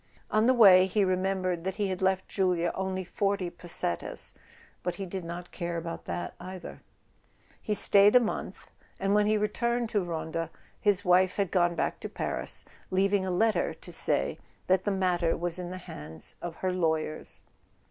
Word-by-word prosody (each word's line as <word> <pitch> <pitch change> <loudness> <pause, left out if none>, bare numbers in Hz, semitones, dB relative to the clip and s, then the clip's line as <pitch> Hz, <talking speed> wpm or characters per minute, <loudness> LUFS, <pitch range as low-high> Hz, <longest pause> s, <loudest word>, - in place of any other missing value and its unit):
On 215 +2 +3
the 260 - +6
way 190 -5 +8
he 205 +2 +1
remembered 185 -2 0
that 190 0 -3
he 205 -2 -1
had 185 0 -3
left 190 0 +1
Julia 180 -3 +1
only 190 0 -2
forty 195 0 -1
pesetas, 175 - -1 0.5
but 180 -1 -2
he 195 - -5
did 185 0 -5
not 170 +1 -7
care 170 -1 -4
about 165 0 -6
that 175 - -4
either... 185 -1 -8 0.8
He 210 - -1
stayed 200 +2 +6
a - - +10
month, 230 -3 -4 0.3
and 195 +1 +1
when 210 0 +4
he 215 0 +3
returned 235 +3 0
to 205 -4 0
Ronda 165 -1 -3 0.3
his 205 -1 +2
wife 180 +1 +4
had 195 -4 -1
gone 175 -2 +2
back - - -1
to - - -6
Paris, - - -3 0.2
leaving 195 0 +2
a - - -1
letter 215 +5 +1
to - - -11
say - - 0 0.3
that 185 0 +2
the - - +2
matter 180 -4 +1
was 175 +1 +1
in 175 -1 -5
the 185 - -6
hands 80 - -7
of 175 -1 -5
her 185 +2 -1
lawyers. 160 -3 -2
185 Hz, 180 wpm, -29 LUFS, 175-200 Hz, 0.8 s, a